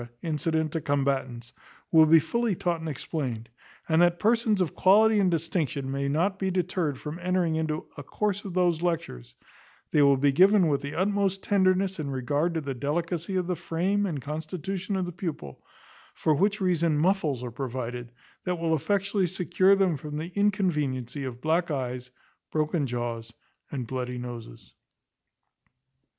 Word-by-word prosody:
incident 160 -1 -1
to 165 - -2
combatants, 135 -4 -1 0.4
will 160 -1 +7
be 165 +1 +7
fully 235 +5 0
taught 170 -1 -1
and 160 0 -5
explained; 130 -6 -4 0.4
and 160 +1 +3
that 175 0 +4
persons 225 0 +2
of 180 -5 0
quality 215 +3 +5
and 190 -2 +3
distinction 155 -5 -1
may 140 0 -1
not 180 +7 0
be 190 - 0
deterred 180 -5 -1
from 150 +5 -7
entering 180 -2 0
into 160 -1 -2
A - - -5
course 205 +7 -2
of 190 -3 -7
those 175 -3 +2
lectures, 65 - -3 0.6
they 150 - +4
will 140 -1 +5
be 140 +1 +3
given 185 +3 +5
with 140 -2 +1
the 140 +1 -6
utmost 195 +1 0
tenderness 190 -1 +2
and 140 -2 -3
regard 145 +6 0
to 160 - 0
the 140 -2 -4
delicacy 170 +7 -2
of 185 -1 +1
the 180 0 -1
frame 185 +5 0
and 155 -6 -3
constitution 170 - -4
of 190 -1 0
the 175 - -5
pupil, 160 - -6 0.5
for 155 - +2
which 200 +7 +1
reason 170 -5 +1
muffles 155 -6 +1
are 125 - -5
provided, 125 -1 -5 0.3
that 180 -1 -1
will 165 -1 +1
effectually 200 +3 0
secure 185 +2 +3
them 190 -5 +2
from 150 +2 -6
the 165 +3 -5
inconveniency 150 - 0
of 125 -1 -7
black 165 +3 +1
eyes, 125 -3 -3 0.4
broken 155 -1 0
jaws, 120 -2 -4 0.4
and 130 -4 -3
bloody 125 0 -4
noses. 120 - -8
160 Hz, 165 wpm, -27 LUFS, 140-185 Hz, 0.6 s, will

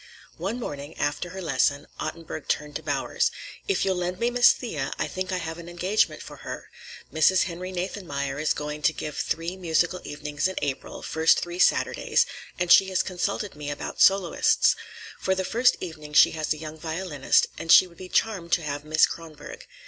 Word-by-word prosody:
One 200 +8 -3
morning, 145 - -6
after 145 +4 -1
her 190 +2 -7
lesson, 140 -1 +1
Ottenburg 160 -1 -6
turned 150 -1 -2
to - - -12
Bowers. 145 -3 0 0.4
"If 400 - +1
you'll 190 -1 +1
lend 180 0 -2
me 235 +1 +1
Miss 245 0 +7
Thea, 150 - -4
I - - -1
think 185 +1 -4
I 185 - 0
have 165 -1 -5
an 170 0 -9
engagement 180 +5 0
for - - -11
her. - - -8 0.4
Mrs. 160 +4 +4
Henry 185 +1 -5
Nathanmeyer 150 -7 -3
is 155 - +1
going 150 0 -5
to 155 - +3
give 150 -1 -5
three 165 +3 -2
musical 175 0 0
evenings 145 +2 -2
in 190 - -5
April, 140 -2 -4
first 160 +1 +3
three 175 +1 -5
Saturdays, - - +3 0.3
and 180 -1 0
she 195 - +8
has 185 - +1
consulted 195 +2 -2
me 150 -1 -6
about 145 - -5
soloists. 195 -3 +4 0.4
For 190 - +1
the 190 0 -2
first 240 +6 +3
evening 155 -4 -8
she - - +7
has 155 -1 -3
a 155 - +1
young 155 0 -8
violinist, 160 -3 +1
and 165 - -1
she - - +9
would 170 -2 -17
be 185 -1 -9
charmed 190 -7 0
to 170 - +3
have 145 -1 -4
Miss 155 +1 +4
Kronborg. 155 -3 -9
165 Hz, 190 wpm, -26 LUFS, 150-185 Hz, 0.4 s, she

